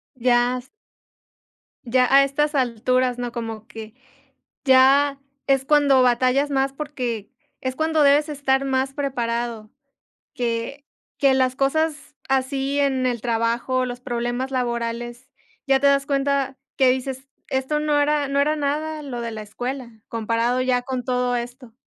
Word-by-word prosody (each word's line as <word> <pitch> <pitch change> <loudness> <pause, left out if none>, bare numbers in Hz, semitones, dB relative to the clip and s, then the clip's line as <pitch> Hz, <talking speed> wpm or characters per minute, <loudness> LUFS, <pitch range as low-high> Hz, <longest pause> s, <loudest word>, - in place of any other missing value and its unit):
Ya. 245 0 +2 1.2
Ya 250 +1 +3
a 275 0 +8
estas 295 +2 0
alturas, 255 -1 +1
¿no? 245 -1 -4
Como 225 -2 -6
que, 220 -2 -10 0.7
ya 275 +1 +5 0.3
es 270 -1 +2
cuando 285 -3 +4
batallas 255 +3 +2
más 270 -1 +1
porque 255 -7 -4 0.3
es 260 0 -3
cuando 315 -1 +1
debes 290 +2 +4
estar 275 -2 0
más 265 0 0
preparado, 235 -5 -3 0.6
que 245 +2 -3 0.3
que 275 -1 +4
las 260 -1 +2
cosas 295 +2 -1
así 270 +1 0
en 265 -2 +1
el 240 -2 -1
trabajo, 235 +2 0
los 245 0 -6
problemas 240 +1 -3
laborales, 240 -1 -3 0.4
ya 270 -1 +3
te 280 - +3
das 275 0 +3
cuenta 275 -1 0 0.2
que 265 - +4
dices: 260 +1 -3 0.2
"Esto 265 +3 -1
no 300 -1 +1
era 295 0 +1
no 280 +1 +1
era 300 +2 +2
nada 305 +2 -2
lo 260 -4 -5
de 235 0 -4
la 220 -1 -6
escuela, 245 +4 -5 0.2
comparado 230 +2 0
ya 255 -1 +1
con 255 -1 -4
todo 250 -1 0
esto". 245 0 -7
260 Hz, 145 wpm, -22 LUFS, 240-280 Hz, 1.2 s, a